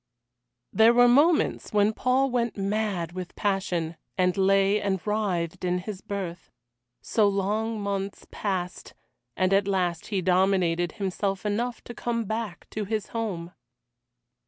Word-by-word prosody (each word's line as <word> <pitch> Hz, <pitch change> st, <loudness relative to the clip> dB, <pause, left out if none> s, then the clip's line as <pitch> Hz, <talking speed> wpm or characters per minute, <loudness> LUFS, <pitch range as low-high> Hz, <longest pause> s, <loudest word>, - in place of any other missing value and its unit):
There 225 Hz, +2 st, +6 dB
were 245 Hz, 0 st, +7 dB
moments 295 Hz, +4 st, +3 dB
when 210 Hz, +1 st, +3 dB
Paul 260 Hz, +3 st, +1 dB
went 240 Hz, -2 st, 0 dB
mad 195 Hz, -4 st, -1 dB
with 180 Hz, -1 st, -7 dB
passion, 180 Hz, -5 st, -1 dB, 0.2 s
and 180 Hz, -1 st, +2 dB
lay 195 Hz, +1 st, +3 dB
and 195 Hz, -2 st, 0 dB
writhed 195 Hz, -7 st, -1 dB
in 180 Hz, 0 st, +1 dB
his 190 Hz, +1 st, -6 dB
berth. 195 Hz, -5 st, -5 dB, 0.5 s
So 215 Hz, -2 st, +3 dB
long 210 Hz, +3 st, 0 dB
months 200 Hz, -1 st, -3 dB
passed, 185 Hz, -3 st, -4 dB, 0.4 s
and 185 Hz, +1 st, +2 dB
at 200 Hz, 0 st, +3 dB
last 180 Hz, -4 st, 0 dB
he 200 Hz, -3 st, -1 dB
dominated 180 Hz, -2 st, +2 dB
himself 195 Hz, 0 st, -2 dB
enough 235 Hz, +4 st, -1 dB
to 240 Hz, -, -8 dB
come 230 Hz, -1 st, -2 dB
back 220 Hz, -3 st, -4 dB
to 215 Hz, -1 st, -3 dB
his 215 Hz, 0 st, -3 dB
home. 190 Hz, -7 st, -3 dB
200 Hz, 135 wpm, -26 LUFS, 185-220 Hz, 0.5 s, were